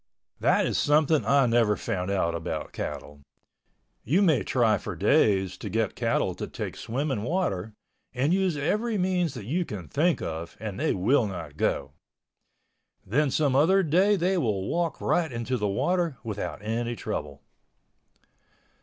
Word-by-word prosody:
That -, -, +3 dB
is -, -, 0 dB
something 150 Hz, +1 st, +3 dB
I 140 Hz, -1 st, +4 dB
never 115 Hz, -3 st, +3 dB
found 90 Hz, 0 st, -3 dB
out 95 Hz, -4 st, 0 dB
about 85 Hz, -1 st, -4 dB
cattle—you 75 Hz, -, -5 dB
may 155 Hz, -, +3 dB
try 110 Hz, -4 st, +2 dB
for -, -, -6 dB
days 95 Hz, -, +2 dB
to 105 Hz, -, -6 dB
get 110 Hz, +1 st, 0 dB
cattle -, -, 0 dB
to -, -, -6 dB
take -, -, -6 dB
swimming 135 Hz, -1 st, -2 dB
water 110 Hz, -, -2 dB, 0.4 s
and 135 Hz, +6 st, +1 dB
use 190 Hz, -4 st, +1 dB
every 215 Hz, +10 st, 0 dB
means 180 Hz, -5 st, 0 dB
that 115 Hz, -5 st, -7 dB
you 165 Hz, -, 0 dB
can 95 Hz, -, -7 dB
think 165 Hz, -, +1 dB
of 80 Hz, +1 st, -6 dB
and 105 Hz, -2 st, -5 dB
they -, -, +1 dB
will 110 Hz, +5 st, +2 dB
not 85 Hz, -7 st, -7 dB
go. 70 Hz, -, -1 dB, 1.1 s
Then 140 Hz, +8 st, +1 dB
some 140 Hz, -1 st, +1 dB
other 190 Hz, +8 st, +4 dB
day 185 Hz, +6 st, +3 dB
they 185 Hz, 0 st, +1 dB
will 100 Hz, -, -1 dB
walk 170 Hz, -1 st, -1 dB
right 165 Hz, -4 st, +1 dB
into 120 Hz, +2 st, -2 dB
the 105 Hz, -4 st, -1 dB
water 170 Hz, -, 0 dB
without 100 Hz, -6 st, -5 dB
any 115 Hz, +2 st, -2 dB
trouble. 75 Hz, -9 st, -5 dB
120 Hz, 155 wpm, -27 LUFS, 100-160 Hz, 1.1 s, I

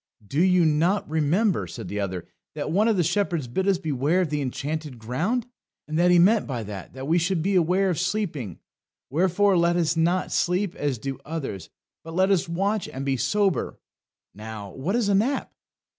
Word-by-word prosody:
"Do 140 Hz, +10 st, 0 dB
you 180 Hz, -2 st, +4 dB
not 165 Hz, +6 st, +2 dB
remember," 160 Hz, -, +1 dB
said 85 Hz, +2 st, -7 dB
the 105 Hz, +3 st, -4 dB
other, 95 Hz, -3 st, -3 dB, 0.3 s
"that 150 Hz, 0 st, -3 dB
one 205 Hz, +6 st, +3 dB
of 220 Hz, -3 st, +2 dB
the 175 Hz, -, +3 dB
shepherds 170 Hz, -4 st, 0 dB
bid 185 Hz, +11 st, -1 dB
us 195 Hz, -2 st, +3 dB
beware 155 Hz, +3 st, 0 dB
of 165 Hz, -5 st, -2 dB
the 150 Hz, -1 st, 0 dB
Enchanted 145 Hz, +1 st, -4 dB
Ground? 160 Hz, -, -1 dB, 0.4 s
And 155 Hz, +1 st, -1 dB
he 175 Hz, -, +6 dB
meant 205 Hz, +5 st, +4 dB
by 120 Hz, -4 st, -3 dB
that 100 Hz, -3 st, -8 dB
that 130 Hz, +1 st, -7 dB
we 165 Hz, +3 st, +3 dB
should 170 Hz, -1 st, 0 dB
beware 185 Hz, 0 st, +2 dB
of 170 Hz, -, -2 dB
sleeping; 170 Hz, -, -2 dB, 0.5 s
wherefore 190 Hz, +5 st, +3 dB
let 170 Hz, 0 st, +3 dB
us 170 Hz, -1 st, +1 dB
not 170 Hz, +3 st, +1 dB
sleep 180 Hz, +1 st, +1 dB
as 145 Hz, -3 st, -2 dB
do 135 Hz, +4 st, -5 dB
others, 140 Hz, -, -5 dB, 0.3 s
but 165 Hz, 0 st, -8 dB
let 190 Hz, +2 st, +3 dB
us 180 Hz, -3 st, +1 dB
watch 195 Hz, +4 st, -1 dB
and 135 Hz, +1 st, -6 dB
be 135 Hz, -1 st, +1 dB
sober." 200 Hz, -, 0 dB, 0.5 s
Now, 105 Hz, -1 st, -8 dB
what 165 Hz, -, -2 dB
is 240 Hz, -4 st, +1 dB
a 200 Hz, -, +2 dB
nap? 235 Hz, +8 st, 0 dB
165 Hz, 190 wpm, -25 LUFS, 135-190 Hz, 0.5 s, he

